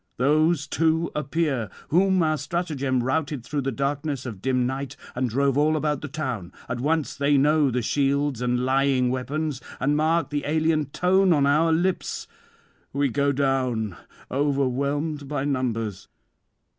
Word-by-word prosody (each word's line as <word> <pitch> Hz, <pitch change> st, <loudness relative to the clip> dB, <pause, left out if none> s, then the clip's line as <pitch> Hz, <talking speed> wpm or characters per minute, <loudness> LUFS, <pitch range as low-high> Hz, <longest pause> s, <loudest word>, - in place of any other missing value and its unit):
Those 150 Hz, +3 st, +3 dB
too 160 Hz, +2 st, +1 dB
appear, 150 Hz, -, -1 dB, 0.2 s
whom 185 Hz, +2 st, +3 dB
our 155 Hz, -1 st, +2 dB
stratagem 140 Hz, -7 st, -1 dB
routed 140 Hz, -1 st, -1 dB
through 145 Hz, +4 st, -2 dB
the 135 Hz, 0 st, -1 dB
darkness 140 Hz, +1 st, -2 dB
of 105 Hz, -7 st, -7 dB
dim 125 Hz, 0 st, +1 dB
night 135 Hz, +2 st, -4 dB, 0.2 s
and 125 Hz, 0 st, -1 dB
drove 140 Hz, +3 st, +1 dB
all 155 Hz, +1 st, +3 dB
about 150 Hz, -2 st, -1 dB
the 145 Hz, -, -5 dB
town; 125 Hz, -, -4 dB, 0.2 s
at 120 Hz, -, -3 dB
once 155 Hz, +3 st, 0 dB
they 140 Hz, +1 st, +2 dB
know 150 Hz, +1 st, +4 dB
the 125 Hz, -1 st, -1 dB
shields 140 Hz, 0 st, 0 dB
and 125 Hz, 0 st, 0 dB
lying 130 Hz, -1 st, +2 dB
weapons, 135 Hz, +2 st, -2 dB, 0.2 s
and 145 Hz, +3 st, +1 dB
mark 160 Hz, +1 st, +1 dB
the 145 Hz, -1 st, -1 dB
alien 155 Hz, 0 st, +2 dB
tone 185 Hz, +5 st, +3 dB
on 145 Hz, -3 st, +3 dB
our 155 Hz, +4 st, +3 dB
lips. 175 Hz, +3 st, -1 dB, 0.6 s
We 140 Hz, 0 st, +1 dB
go 140 Hz, +3 st, +1 dB
down, 130 Hz, -7 st, 0 dB, 0.4 s
overwhelmed 140 Hz, +2 st, 0 dB
by 140 Hz, -1 st, -2 dB
numbers. 115 Hz, -7 st, -2 dB
140 Hz, 150 wpm, -25 LUFS, 130-155 Hz, 0.6 s, know